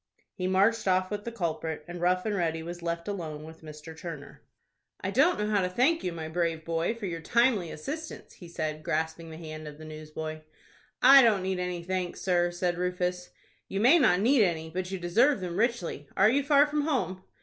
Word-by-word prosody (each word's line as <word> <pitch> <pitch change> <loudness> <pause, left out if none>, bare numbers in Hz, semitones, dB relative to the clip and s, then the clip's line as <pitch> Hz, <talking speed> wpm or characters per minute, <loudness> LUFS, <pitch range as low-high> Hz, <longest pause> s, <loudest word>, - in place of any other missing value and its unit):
He 185 - -3
marched 200 +4 +2
off 185 0 +2
with 205 0 -4
the 235 - -4
culprit, 160 -6 -3
and 175 0 -7
Rough 180 +1 +2
and 215 - 0
Ready 165 -4 -1
was 175 +1 -7
left 170 0 -3
alone 160 -7 -5
with 160 +1 -12
Mr. 155 +1 -10
Turner. 160 -4 -9 0.6
"I 190 - -3
don't 290 - +4
know 210 - -1
how 205 -2 +3
to 180 - 0
thank 265 - +2
you, 180 - -1
my 160 -2 -6
brave 165 -1 -2
boy, 165 +6 -1
for 230 -3 -6
your 165 -3 -4
timely 230 -1 +2
assistance," 305 - -7
he 175 - -12
said, 155 -2 -4
grasping 160 +2 -2
the 160 - -9
hand 155 -1 -8
of 150 -1 -9
the 155 - -11
newsboy. 155 0 -7 0.6
"I 270 +2 +10
don't 215 -6 +3
need 190 -1 -1
any 180 -1 -3
thanks, 180 0 -3
sir," 175 -2 +2
said 175 0 -2
Rufus. 180 0 -2 0.4
"You 195 - -3
may 265 +11 +6
not 195 - +4
need 250 +3 +4
any, 160 -4 0
but 180 +1 -3
you 190 - -3
deserve 215 +10 +3
them 180 -2 -5
richly. 215 - -1
Are 205 +3 +6
you 280 +3 +2
far 285 0 +5
from 295 0 -1
home?" 255 -11 -1
180 Hz, 210 wpm, -28 LUFS, 160-210 Hz, 0.6 s, I